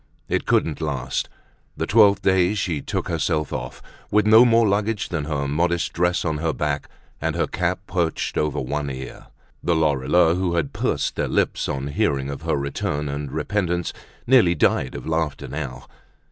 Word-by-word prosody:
It -, -, -1 dB
couldn't 80 Hz, -1 st, +1 dB
last; 65 Hz, -5 st, -2 dB, 0.5 s
the -, -, -1 dB
twelfth 100 Hz, -2 st, +5 dB
day 95 Hz, +1 st, +3 dB
she 85 Hz, -8 st, -1 dB
took -, -, -3 dB
herself 75 Hz, -2 st, -1 dB
off, -, -, -6 dB, 0.3 s
with 105 Hz, 0 st, +3 dB
no 110 Hz, +3 st, +8 dB
more 115 Hz, -1 st, +4 dB
luggage 105 Hz, 0 st, 0 dB
than 80 Hz, -4 st, -2 dB
her 70 Hz, -2 st, -2 dB
modest 85 Hz, +4 st, 0 dB
dress 90 Hz, +1 st, +1 dB
on 80 Hz, -2 st, -1 dB
her 80 Hz, -1 st, 0 dB
back 75 Hz, -1 st, -2 dB, 0.3 s
and -, -, -1 dB
her -, -, +1 dB
cap 90 Hz, +1 st, -1 dB
perched 85 Hz, -4 st, -1 dB
over 75 Hz, -1 st, 0 dB
one 70 Hz, +2 st, -2 dB
ear. 65 Hz, 0 st, -8 dB, 0.3 s
The 85 Hz, -, +1 dB
Lorilleuxs, 80 Hz, +3 st, +3 dB
who 90 Hz, -2 st, 0 dB
had 80 Hz, -5 st, -1 dB
pursed -, -, -1 dB
their -, -, 0 dB
lips -, -, 0 dB
on 70 Hz, 0 st, -3 dB
hearing 70 Hz, -1 st, 0 dB
of 70 Hz, -, -7 dB
her -, -, 0 dB
return 70 Hz, +1 st, -2 dB
and 70 Hz, -1 st, -4 dB
repentance, 90 Hz, -4 st, -1 dB, 0.3 s
nearly 115 Hz, -9 st, +5 dB
died 65 Hz, -, +1 dB
of -, -, -7 dB
laughter 80 Hz, -3 st, -2 dB
now. 70 Hz, -4 st, -6 dB
80 Hz, 175 wpm, -23 LUFS, 70-90 Hz, 0.5 s, no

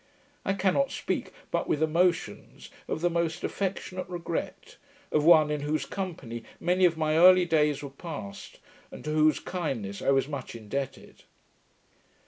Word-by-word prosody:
I 195 Hz, -, 0 dB
cannot 195 Hz, +8 st, +2 dB
speak, -, -, -3 dB, 0.2 s
but -, -, 0 dB
with 155 Hz, -, +1 dB
emotions 165 Hz, -, 0 dB, 0.2 s
of -, -, -3 dB
the 175 Hz, -, +3 dB
most 170 Hz, 0 st, -1 dB
affectionate 185 Hz, -1 st, -3 dB
regret, 170 Hz, -2 st, -5 dB, 0.3 s
of 150 Hz, -, +2 dB
one, 155 Hz, -2 st, +6 dB
in 150 Hz, -1 st, -1 dB
whose 150 Hz, +2 st, -1 dB
company 140 Hz, -, -5 dB, 0.2 s
many 180 Hz, +1 st, +3 dB
of 165 Hz, -2 st, +2 dB
my 155 Hz, -1 st, +1 dB
early 180 Hz, +1 st, +7 dB
days 150 Hz, -4 st, +2 dB
were 140 Hz, -, -6 dB
passed, 140 Hz, -, -8 dB, 0.3 s
and -, -, -10 dB
to 150 Hz, -, -3 dB
whose 155 Hz, -1 st, +3 dB
kindness 120 Hz, -, -4 dB
I -, -, 0 dB
was 135 Hz, 0 st, +3 dB
much 140 Hz, -5 st, -6 dB
indebted. 115 Hz, +5 st, -6 dB
155 Hz, 150 wpm, -28 LUFS, 140-180 Hz, 0.3 s, early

